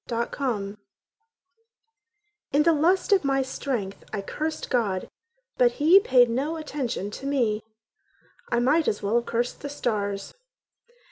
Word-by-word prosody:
John 235 0 -1
Ballard 210 -7 -3 1.7
In 290 +2 +4
the 335 +1 +4
lust 350 +7 +2
of 390 -4 +5
my 270 -1 +1
strength 250 -7 -4
I 200 -2 -3
cursed 310 +8 -4
God, 210 -7 0 0.5
but - - +5
he 325 +6 +6
paid 255 - +5
no 270 +7 -1
attention 260 - -4
to 270 +6 -6
me: 235 -7 +1 0.9
I 240 - +2
might 290 +7 +3
as 210 - -1
well 210 +4 +2
have 235 - -2
cursed 240 +1 -2
the 285 - -5
stars. 205 -7 -2
255 Hz, 140 wpm, -25 LUFS, 215-295 Hz, 1.7 s, he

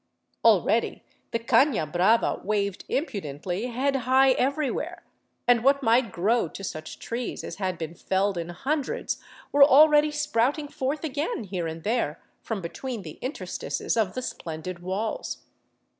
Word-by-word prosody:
Already - - +3 0.3
the - - 0
cana 245 - +3
hrava 180 +9 +2
waved 200 -2 -1
impudently 195 - -3
head 270 +3 0
high 260 +1 +4
everywhere, 275 +3 -1 0.4
and 240 -2 +5
what 275 +1 +4
might 230 -1 +3
grow 210 +4 +1
to 195 - -9
such 155 -4 -6
trees 235 +1 -4
as - - -6
had 185 -3 -2
been 160 0 -5
felled 190 +3 0
in 170 -1 -4
hundreds 275 - -2 0.3
were 285 0 +7
already 295 +2 +7
sprouting 295 0 0
forth 285 +2 -3
again 300 - -2
here 180 -4 -3
and 160 0 -6
there 215 -9 0 0.2
from 220 -4 -4
between 225 +6 -5
the 155 -4 -10
interstices 260 +4 -3
of 215 -5 0
the 255 - -3
splendid 170 -2 -6
walls. 190 +5 -3
230 Hz, 145 wpm, -26 LUFS, 185-270 Hz, 0.4 s, were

